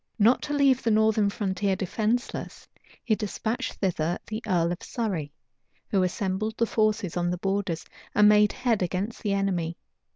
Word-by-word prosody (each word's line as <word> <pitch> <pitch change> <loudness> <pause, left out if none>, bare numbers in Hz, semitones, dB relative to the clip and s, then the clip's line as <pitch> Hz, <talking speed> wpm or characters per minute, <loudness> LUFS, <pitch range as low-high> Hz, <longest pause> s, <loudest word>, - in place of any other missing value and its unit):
Not 230 +3 +4
to 290 - -3
leave 275 -3 +4
the 230 - 0
northern 215 -1 +3
frontier 195 -1 -1
defenceless, 220 +6 -2 0.4
he 230 - +1
despatched 220 +3 -2
thither 175 -3 -1
the 215 +1 -5
earl 170 -3 +2
of 175 - -4
Surrey, 190 - -3 0.6
who 195 - +3
assembled 190 +3 -1
the 230 - +3
forces 215 -4 0
on 175 0 0
the 180 - -1
borders, 195 -3 -2 0.3
and 210 0 +6
made 210 0 +6
head 240 -5 0
against 185 +5 -2
the 205 -2 0
enemy. 180 -4 -1
205 Hz, 160 wpm, -26 LUFS, 185-220 Hz, 0.6 s, and